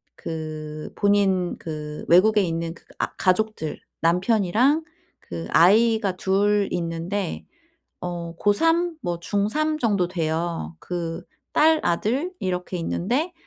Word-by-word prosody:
그 155 -1 -6
본인 195 -3 +2
그 150 -2 -6
외국에 210 +5 +6
있는 165 -1 -2
그 - - -19 0.2
아 - - -1
가족들, 185 -3 0 0.2
남편이랑 215 - +3 0.4
그 85 -1 -6
아이가 210 +1 +4
2 200 +2 +2
있는데 170 +2 -3 0.6
어 170 -1 -5
고3, 330 +11 +2
뭐 175 -1 -2
중3 255 - 0
정도 200 - +1
돼요. 165 - -2
그 170 -2 -4 0.3
딸, 315 0 +4
아들 255 - 0
이렇게 180 0 -2
있는데 245 - -1
185 Hz, 190 characters per minute, -24 LUFS, 165-215 Hz, 0.6 s, 외국에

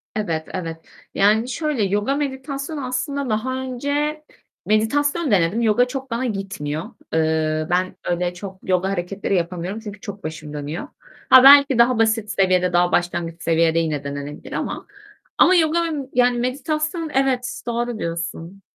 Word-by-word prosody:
Evet, 165 -7 -2
evet. 165 -3 -4 0.4
Yani, 215 +4 +3
şöyle 300 -4 -1
yoga 205 +7 0
meditasyonu 275 +1 -4
aslında 275 +2 -2
daha 225 +4 -1
önce 285 +4 -2 0.4
Meditasyon 285 +7 +1
denedim, 190 +4 +2
yoga 235 +2 +3
çok 265 0 -6
bana 235 +3 -1
gitmiyor. 195 -8 -3 0.3
Eee, 155 -1 +1
ben 185 +1 0
öyle 175 0 0
çok 190 +1 -9
yoga 185 0 +1
hareketleri 195 +1 -2
yapamıyorum 180 +3 -2
çünkü 205 -2 -9
çok 200 0 -8
başım 155 -1 -7
dönüyor. 150 +2 -5 0.4
Ha, 260 - +9
belki 280 -1 +8
daha 235 +1 +4
basit 220 -1 +1
seviyede 185 -2 +2
daha 175 0 +3
başlangıç 170 -1 -1
seviyede 165 0 +2
yine 155 -3 -1
denenebilir 140 +1 -7
ama - - -4 0.5
Ama 370 - +6
yoga 325 -1 +3 0.3
yani 245 0 +3
meditasyon 305 +5 -2
Evet, 260 -2 0
doğru 235 -1 -2
diyorsun. 170 +2 -5
210 Hz, 140 wpm, -21 LUFS, 175-260 Hz, 0.5 s, Ha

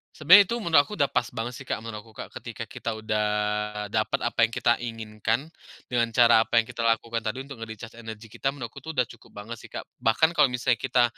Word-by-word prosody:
Sebenarnya 180 +7 +8
itu 235 - -2
menurut 170 -6 +3
aku - - -9
udah 145 -8 +1
pas - - +1
banget 120 +1 -4
sih, 140 - -10
Kak, 115 - -3
menurut 110 -1 -7
aku, 110 - -18
Kak. - - -8
Ketika - - -7
kita 115 - -4
udah 110 -1 -1 0.6
dapat 110 0 0
apa 120 -1 +3
yang 115 - -8
kita 120 - +2
inginkan, 115 +4 -3 0.4
dengan 115 -2 0
cara 115 -2 +6
apa 115 - +4
yang 115 - -14
kita 115 -2 -3
lakukan 115 0 +1
tadi, 120 +4 -2
untuk 140 -1 -10
nge-recharge 115 0 -9
energi 115 -1 -9
kita, 135 +5 -2
menurutku 120 -5 -8
itu 160 - -7
udah 125 -5 +1
cukup 115 -3 -12
banget 115 +3 -7
sih, - - -14
Kak. - - -4 0.2
Bahkan 160 +9 +2
kalau 150 - +7
misalnya 125 -1 +1
kita, 125 +2 +2
115 Hz, 225 wpm, -26 LUFS, 110-130 Hz, 0.6 s, Sebenarnya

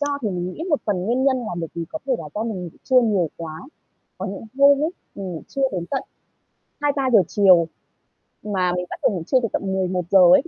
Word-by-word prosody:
do 290 -1 0
thì 215 - 0
mình 180 0 -3
nghĩ - - -6
một 300 - +2
phần 205 -3 +1
nguyên 240 +7 +1
nhân 270 -1 +4
là 225 -7 -4
bởi 165 - -3
vì 170 - -3
có 315 - -5
thể 265 - +2
là - - -6
do 210 - -1
mình 205 -6 -3
ngủ - - -5 0.2
trưa 260 -1 +5
nhiều 205 -8 +2
quá. 160 -1 -7 0.6
Có 190 - -3
những 195 +3 -6
hôm 280 0 +8
ấy, 315 - +1 0.2
mình 190 -2 -5
ngủ 160 - -6
trưa 275 - -3
đến 180 -3 -2
tận 270 - -1 0.8
2:00-3:00 275 -6 +3
chiều, 185 -5 +5 0.8
mà 190 -4 0
mình 180 0 -2
bắt - - -6
đầu - - +4
ngủ 175 -4 -3
trưa 260 - +4
từ - - +2
tận - - 0
11:00 185 0 +2
ấy, 185 - +7
200 Hz, 235 wpm, -22 LUFS, 180-260 Hz, 0.8 s, hôm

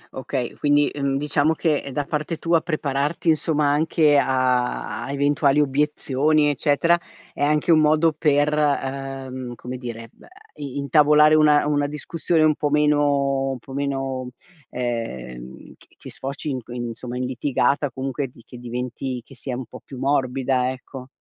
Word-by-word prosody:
Okay, 130 -2 -3
quindi, 145 0 +3
mhmm, 140 -1 -1
diciamo 150 +2 +1
che 155 -4 -1
da 145 +3 -1
parte 155 +3 -3
tua 165 0 +2
prepararti 155 -1 -1
insomma, 155 -2 +2
anche 150 0 +3
a 130 -2 0
a 135 - -5
eventuali 140 0 +2
obiezioni, 150 +1 +2
eccetera, 145 +4 +2 0.3
è - - -3
anche 150 +3 +2
un 160 - +6
modo 155 +1 +3
per, 145 0 +2
uhm, 135 -3 -2
come 125 +2 -7
dire 115 -2 -7
b - - -27
a - - -16 0.3
i 140 -2 -7
intavolare 150 +1 +5
una 150 -1 +5
una 145 -1 +1
discussione 155 +2 -1
un 155 0 +5
po' 145 0 -2
meno 145 -2 +2
un 135 - -3
po' 130 +2 -12
meno, 135 -2 -3 0.4
ehm, 65 - -5
che - - -21
che - - -11
sfoci 140 +3 -5
inc 130 -4 -5
insomma 120 0 -5
in 125 - -2
litigata, 140 +3 0
comunque 135 +2 -3
di 120 -2 -18
che 125 - -12
diventi 125 +1 -5
che - - -15
sia 125 -1 -5
un 130 - -5
po' - - -12
più 135 - -10
morbida, 130 -1 +1
ecco. 130 0 -9
140 Hz, 160 wpm, -22 LUFS, 130-150 Hz, 0.4 s, un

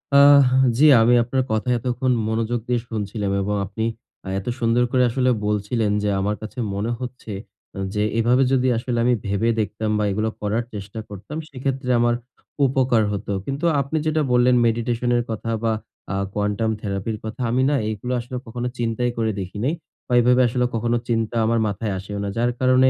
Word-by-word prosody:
আ - - +8 0.6
জি 150 - +5 0.2
আমি 115 +2 +5
আপনার 130 +2 0
কথা 110 +3 0
এতক্ষণ 125 +2 -1 0.2
মনোযোগ 115 +2 -1
দিয়ে 125 -1 +1
শুনছিলাম 105 -2 -3
এবং 105 +2 -1
আপনি 110 +3 -3 0.4
অ্যা 95 - -7
এত 95 - -11
সুন্দর 120 +1 +2
করে 130 -1 +3
আসলে 130 +2 +1 0.2
বলছিলেন 105 +1 0
যে, 105 - +1
আমার 105 +2 0
কাছে 110 +4 -8 0.2
মনে 105 +4 -1
হচ্ছে 125 -3 -7 0.4
অ্যা 95 - -5
যে, 105 - 0 0.2
এভাবে 125 +3 +4
যদি 130 -1 +3
আসলে 120 +1 -2
আমি 125 +1 +3
ভােবে 100 +3 +1
দেখতাম 110 0 -2
বা - - +1
এগুলো 110 +3 0
করার 105 +3 0
চেষ্টা 100 +2 -7
করতাম, 105 +10 -8
সেক্ষেত্রে 135 -1 -3
আমর 120 0 +3 0.5
উপকার 130 -4 +2
হতো। 100 0 -4
কিন্তু 140 +5 -3 0.2
আপনি 140 +4 -2
যেটা 155 0 +1
বল্লেন, 125 0 +4
meditation 120 +1 0
এর 120 - +1
কথা 115 +1 -3
বা 115 - +2 0.4
আ - - -1 0.2
quantum 105 +2 0
therapy 100 +1 -3
র - - -8
কথা। 110 +4 -6
আমি 130 +2 +2
না 145 - +2
এইগুলো 110 +4 -4
আসলে 120 +2 -7
কখনো 120 +2 -3
চিন্তাই 120 +1 0
করে 110 -1 +1
দেখিনি 105 +8 -2 0.4
বা 125 - -2
এভাবে 125 +1 +4
আসলে 125 +1 0
কখনো 120 +1 +1
চিন্তা 115 -1 -1
আমার 115 +1 +2
মাথায় 100 0 -2
আসেও 100 +2 -6
না। 100 - -2
যার 120 +1 +2
কারণে 130 0 +5
115 Hz, 185 wpm, -22 LUFS, 105-125 Hz, 0.6 s, আ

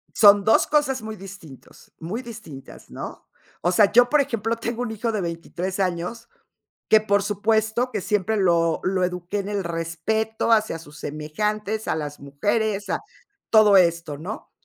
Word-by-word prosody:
Son 205 -1 +7
2 220 +3 +4
cosas 295 -3 +1
muy 220 0 -6
distintos 190 -8 -13
muy 185 +9 -4
distintas, 220 - -11
¿no? - - -8 0.3
O 175 - +1
sea, 200 +2 +4
yo, 245 +2 +6
por 300 +1 +4
ejemplo, 230 -4 -1
tengo 230 +1 -4
un 240 - -4
hijo 220 +1 -2
de 215 -2 -2
23 175 +2 -4
años 185 +5 -2 0.6
que, 220 - +6
por 200 -1 +1
supuesto, 220 +4 0
que - - -2
siempre 210 +2 0
lo 170 -4 +2
lo 185 -1 +1
eduqué 180 +2 -3
en 195 - -5
el 205 -1 -2
respeto 170 +8 -2
hacia 215 -6 +2
sus 150 -1 -13
semejantes, 210 +9 -3
a - - +1
las 150 -2 -5
mujeres, 200 +9 -1
a - - 0 0.5
todo 215 -3 +6
esto, 170 -4 +2
¿no? 185 +8 -7
200 Hz, 165 wpm, -23 LUFS, 170-220 Hz, 0.6 s, Son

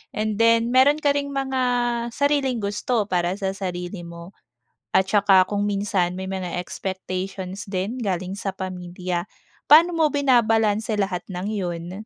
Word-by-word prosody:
and 215 0 -2
then 230 +1 +4
meron 265 +3 +5
ka 290 -2 +2
ring 280 0 -1
mga 265 -1 -1 0.5
sariling 280 -4 +1
gusto 210 +3 0
para 180 0 0
sa 195 -1 -2
sarili 180 -1 -5
mo 170 +2 -10 0.6
at 190 0 +4
saka 195 -3 +5
kung 205 -1 -1
minsan 195 -3 0
may 190 0 -5
mga 185 -2 -4
expectations 190 +1 -5
din 195 +6 -3
galing 185 -4 -2
sa 200 -2 -3
pamilya, 180 -1 -4 0.4
paano 330 +4 +7
mo 320 -2 +4
binabalanse 225 -5 +2
lahat 190 -3 -1
ng 180 +2 -4
yun? 175 -4 -4
195 Hz, 145 wpm, -23 LUFS, 185-230 Hz, 0.6 s, paano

